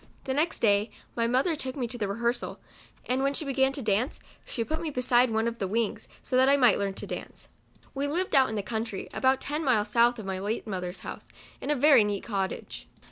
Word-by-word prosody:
The 265 - -2
next 310 +5 0
clay 205 0 +3 0.3
my 230 -1 +1
mother 265 +8 +2
took 260 -3 -3
me 260 -4 -2
to 245 - -6
the 205 - 0
rehearsal, 235 +4 -1 0.5
and 255 +1 0
when 275 +1 +1
she 310 - +1
began 270 -1 +2
to 275 - -5
dance, 215 +5 0 0.2
she 230 - -3
put 315 +7 -3
me 325 - -2
beside 250 -2 +3
one 220 +1 0
of 235 0 -4
the 195 - -1
wings, 220 +2 -1 0.2
so - - -2
that 260 +1 +5
I 280 - +5
might 245 -6 +5
learn 200 -1 -2
to - - -3
dance. - - -7 0.5
We 280 +1 -1
lived 350 +6 -1
out 265 -2 +5
in 220 - -4
the 205 - -2
country, 220 -2 -4
about 260 0 +2
ten 300 +3 -3
miles 230 -7 +2
south 240 +1 +4
of 215 - -7
my 190 -1 -3
late 210 +4 -3
mothers 180 -3 -4
house, - - -8 0.3
in - - -5
a 295 - +3
very 280 -3 +6
neat 205 -1 -2
cottage. 195 -4 -4
240 Hz, 235 wpm, -28 LUFS, 210-275 Hz, 0.5 s, very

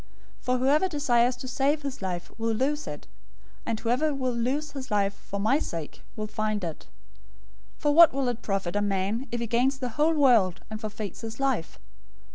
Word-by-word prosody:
016:025 - - -31
For 255 0 +2
whoever 285 +8 +3
desires 250 -6 +2
to 250 +1 -8
save 280 +4 +1
his 275 -5 -5
life 180 -2 -4
will 225 0 0
lose 290 +6 0
it, - - -7 0.6
and 225 -2 -1
whoever 255 +6 +1
will 255 -2 -1
lose 260 +6 -1
his 265 -2 -7
life 200 -2 +1
for 200 - -7
my 220 +8 +3
sake 165 - -6
will 215 - -3
find 215 -1 -2
it. 165 -3 -6 0.9
016:026 - - -31
For 295 - +4
what 335 0 +9
will 270 -1 -1
it 240 -1 -2
profit 195 -3 -2
a 205 - +2
man, 205 +5 -1
if 240 - -2
he 235 - -1
gains 245 +4 +2
the 255 -2 -3
whole 300 +7 +2
world, 230 - +4
and 215 0 -5
forfeits 210 -3 -5
his 225 +1 -7
life? 265 -11 -1
240 Hz, 200 wpm, -27 LUFS, 210-275 Hz, 0.9 s, what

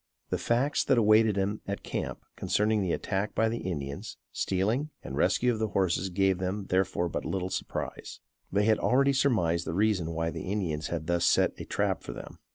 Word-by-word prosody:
The - - 0
facts 130 +5 +1
that 135 - +3
awaited 110 -1 +5
them 100 +2 -1
at 100 0 -4
camp - - -4
concerning 105 0 +1
the 90 -3 0
attack 100 +4 -2
by 110 0 +3
the 115 +1 -2
Indians, 70 -6 -5
stealing 110 +11 0
and 65 +3 -6
rescue 120 - +2
of 110 - -4
the 110 - +1
horses 95 -2 0
gave 95 0 +2
them 95 +2 -2
therefore 90 -1 +1
but 85 - -3
little 95 -1 -2
surprise. - - -4 0.3
They 100 +2 +2
had 110 0 +3
already 140 +2 +3
surmised 100 -12 +2
the 80 - -2
reason 100 -5 +2
why 80 0 -1
the 95 - -5
Indians 80 -7 -1
had 80 -2 -3
thus 85 0 +1
set - - +3
a - - -5
trap - - 0
for - - -7
them. - - -10
95 Hz, 195 wpm, -29 LUFS, 85-110 Hz, 0.3 s, awaited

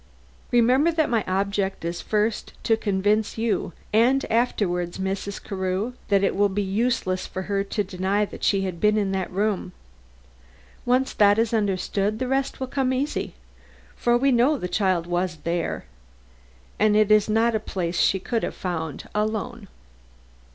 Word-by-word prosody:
Remember 255 +7 +4
that 315 -5 0
my 225 -3 +2
object 195 -1 -1
is 170 +1 -3
first 215 +1 -1
to 225 - +3
convince 210 +1 0
you 220 -6 -1 0.2
and 250 +5 +4
afterward 180 -7 0
Mrs. 195 +1 -3
Carew, 190 +4 -2
that 200 -2 +3
it 195 - +1
will 205 +1 +3
be 200 +1 -1
useless 195 -2 -1
for 185 - -5
her 200 0 -1
to 205 +1 -1
deny 195 +2 0
that - - -11
she 195 -1 +3
has 190 -1 -2
been 210 +5 +2
in 200 -2 0
that 190 -1 -2
room. 195 -1 -1 1.1
Once 255 +2 +2
that 205 0 +5
is 225 0 +1
understood, 205 0 0
the 255 +2 -2
rest 270 +1 -1
will 260 - -2
come 260 0 -1
easy; 270 - -2 0.6
for 240 0 +2
we 275 +2 +2
know 255 +5 +3
the 180 - -4
child 185 -3 +1
was 175 0 -1
there, 170 - -2 0.9
and 215 -1 +4
it 215 0 +4
is 215 0 +5
not 225 +2 +3
a 220 - +1
place 175 -4 -3
she 195 - +3
could 225 +4 -2
have - - -3
found 160 -6 -4
alone." 215 +1 -2
205 Hz, 165 wpm, -24 LUFS, 190-230 Hz, 1.1 s, that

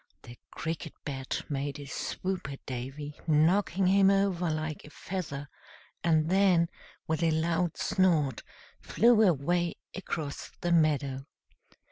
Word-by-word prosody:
The 120 - -11
Cricket 160 -1 -5
Bat 135 -2 -3
made 140 0 -3
a 145 - -7
swoop 185 +4 -3
at 135 - -10
Davy, 135 +4 -6
knocking 175 +5 +3
him 195 +1 +5
over 195 -3 +2
like 155 -1 -3
a - - -12
feather, 150 -4 -5 0.6
and 160 -2 +3
then, 180 -2 +4 0.4
with 160 0 -1
a 165 - +3
loud 165 +1 0
snort, 165 -8 +2 0.4
flew 235 -1 +4
away 175 -1 +2 0.2
across 155 -6 -5
the 175 - 0
meadow. 145 -4 +2
160 Hz, 125 wpm, -29 LUFS, 145-180 Hz, 0.6 s, him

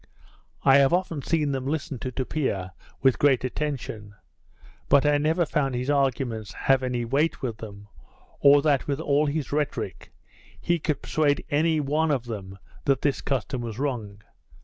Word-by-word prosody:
I 135 0 +7
have 140 +1 +4
often 175 -5 0
seen 150 -1 0
them 135 -1 -3
listen 145 -3 -3
to 130 - -4
Tupia 125 -8 -2 0.3
with 130 -2 +4
great 135 -4 +3
attention; 125 -7 -4 0.7
but 140 0 +5
I 145 0 +3
never 160 +4 +2
found 135 -5 -1
his 125 +3 -1
arguments 125 -7 -1
have 135 +3 +2
any 125 -2 -2
weight 140 +7 0
with 115 -4 -3
them, 105 -2 -10 0.5
or 140 0 +6
that 145 -4 +2
with 140 0 -1
all 150 -1 +2
his 145 -1 -2
rhetoric, 145 -1 -3 0.5
he 170 0 0
could 150 -2 -2
persuade 145 -2 +1
any 155 +2 +2
one 150 +3 +1
of 135 -5 0
them 95 -5 -7 0.3
that 135 -1 +1
this 140 -2 +1
custom 130 -1 -2
was 115 -2 -5
wrong. 110 -7 -4
140 Hz, 165 wpm, -25 LUFS, 120-150 Hz, 0.7 s, I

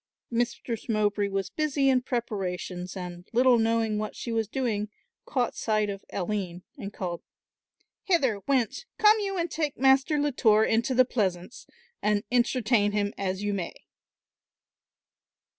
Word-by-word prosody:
Mistress 235 0 -2
Mowbray 210 -2 +1
was 195 -1 -3
busy 290 -3 +1
in 260 -1 +4
preparations 190 -7 -3
and, 180 -1 -7
little 245 0 +5
knowing 225 -1 +1
what 215 0 -4
she 235 - -5
was 225 -1 0
doing, 215 -5 -2 0.4
caught 250 -3 -1
sight 215 -2 0
of 195 0 -8
Aline 185 -2 -3
and 200 - -7
called, 175 -4 -4 0.8
"Hither, 270 - +2
wench, 265 - 0
come 430 +1 +6
you 395 -2 -2
and 340 0 -1
take 305 -3 -2
Master 270 +3 +4
Latour 240 -7 +3
into 230 +4 +1
the 255 +1 +6
pleasaunce 190 -5 -2 0.3
and 210 -1 +1
entertain 235 -4 +2
him 205 -1 0
as 190 0 -3
ye 205 - 0
may." 195 -4 -3
225 Hz, 140 wpm, -27 LUFS, 200-255 Hz, 0.8 s, come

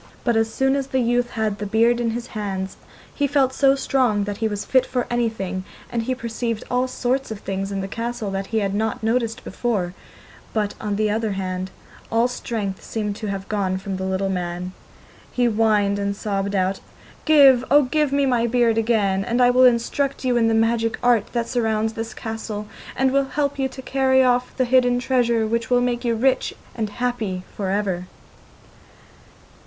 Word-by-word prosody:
But 235 -2 +1
as 225 0 +1
soon 270 +1 +1
as 275 -1 -1
the 265 -1 0
youth 245 0 +1
had 220 -3 -2
the 210 - -3
beard 230 +3 +3
in 235 -1 0
his 235 +1 -3
hands 195 -3 -3 0.4
he 285 - 0
felt 270 -2 +2
so 275 0 +4
strong 250 -6 +1
that 205 0 -4
he 225 - 0
was 205 -1 -4
fit 260 -1 +4
for 255 -1 -2
anything, 220 -6 -1 0.3
and 235 - 0
he 255 +3 -2
perceived 230 -2 -3
all 250 +1 +2
sorts 255 +1 -1
of 220 - -5
things 195 0 -3
in 195 -1 -2
the 195 - -4
castle 230 0 -4
that 195 0 -3
he 220 -1 0
had 195 -1 -1
not 220 +2 -1
noticed 230 0 0
before, 200 -8 -2 0.6
but, 210 -2 0
on 210 -2 -2
the 215 0 +1
other 220 -1 -1
hand, 185 -1 -3 0.4
all 230 +2 +3
strength 215 -6 -4
seemed 210 -2 -3
to 215 - -5
have 195 -1 -4
gone 195 -3 -1
from 190 0 -4
the 190 - -4
little 190 +1 -1
man. 180 0 -3 0.6
He 245 - +1
whined 210 -3 +2
and 200 0 -1
sobbed 200 -1 -2
out: 190 0 0 0.5
'Give, 275 -5 +7
oh 290 +1 +6
give 300 +2 +1
me 280 0 +2
my 240 -3 +2
beard 235 -1 +2
again, 205 -4 +1
and 235 +4 -1
I 245 0 +6
will 255 +1 +6
instruct 260 +3 +1
you 250 -1 +2
in 235 -1 +3
all - - +3
the 225 - +2
magic 225 0 +1
art 240 -4 +3
that 235 -1 -1
surrounds 220 -3 0
this 225 0 -5
castle, 220 -2 -5 0.3
and 265 0 +2
will 275 0 +2
help 285 0 -2
you 265 0 +1
to 260 - -10
carry 265 -1 +3
off 250 0 +1
the 255 - +2
hidden 245 0 +3
treasure, 240 -3 +1
which 230 +1 -1
will 245 -1 +4
make 245 0 -1
you 235 -2 +1
rich 260 +3 +1 0.2
and 220 -3 -2
happy 220 -5 -2
for 195 -2 -2
ever. 190 -3 -1
225 Hz, 200 wpm, -22 LUFS, 205-250 Hz, 0.6 s, Give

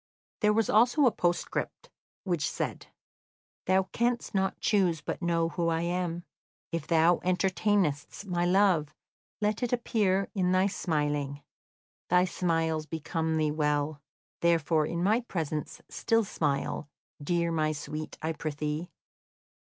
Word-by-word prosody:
There 210 -1 +4
was 220 0 +2
also 245 +7 +4
a 245 - +5
postscript, 175 -3 -2 0.3
which 170 -7 0
said: - - -4 0.8
"Thou 190 +1 +4
canst 240 0 0
not 190 -1 0
choose 185 -6 +2
but - - -5
know 165 -1 +1
who 170 0 -1
I 165 0 +1
am. 175 0 -2 0.5
If 165 -3 -3
thou 165 +1 +4
entertainest 185 -2 0
my 175 -3 -1
love, 180 -4 +3 0.5
let 210 +2 0
it 245 - -1
appear 205 -5 +1
in 185 -2 +1
thy 185 +1 +4
smiling. 145 -6 -1 0.7
Thy 180 +1 +5
smiles 165 -3 0
become 160 0 -2
thee 155 -1 +1
well, 150 -1 0 0.4
therefore 160 -2 +2
in 170 +1 -2
my 215 +5 +3
presence 160 - -4
still 225 0 +1
smile, 145 -5 -2 0.3
dear 170 +2 0
my 155 -1 +1
sweet, 155 +1 -6
I 160 +1 0
prithee." 155 +2 -3
170 Hz, 130 wpm, -29 LUFS, 155-190 Hz, 0.8 s, a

